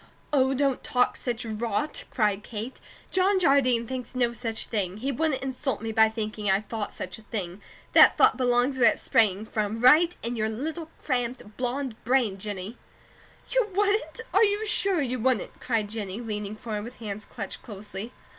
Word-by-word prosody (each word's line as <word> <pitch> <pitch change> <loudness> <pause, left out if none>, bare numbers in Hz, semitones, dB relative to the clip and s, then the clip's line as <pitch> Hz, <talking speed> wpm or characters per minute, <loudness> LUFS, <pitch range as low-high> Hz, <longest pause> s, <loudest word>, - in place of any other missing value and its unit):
"Oh, 265 -1 +3
don't 275 -1 +1
talk 250 0 +2
such 240 -1 -3
rot!" 225 +6 -2
cried 210 -4 +1
Kate. 225 +3 -6 0.3
"John 380 +1 +3
Jardine 260 -8 +3
thinks 255 0 -6
no 240 -2 +1
such 225 -2 -3
thing. 195 -4 -2
He 265 +6 -2
wouldn't 275 0 0
insult 265 -2 -2
me 225 0 -4
by 220 0 +5
thinking 215 -2 -3
I 190 +1 +4
thought 215 0 -5
such 185 +3 -6
a - - -14
thing. 200 -3 -5 0.3
That - - +8
thought - - +6
belongs 250 +1 +1
where 235 -2 +7
it - - -12
sprang 210 -2 +2
from, 215 0 -2
right 310 +8 +6
in 235 +2 -2
your 220 -1 0
little 315 +8 -4
cramped, 245 -5 -2
blonde 250 -1 -3
brain, 235 -6 +1
Jennie." 205 +2 -6 0.7
"You - - +2
wouldn't? 405 -6 +1
Are 400 +4 +6
you 415 +1 +2
sure 395 -6 +2
you 250 -1 -2
wouldn't?" 250 -3 0
cried 225 -4 0
Jennie, 205 -2 -4
leaning 210 -3 -4
forward 215 -2 -5
with 245 +2 -10
hands 210 -2 -6
clutched 200 -4 -7
closely. 205 +1 -8
235 Hz, 175 wpm, -27 LUFS, 215-265 Hz, 0.7 s, That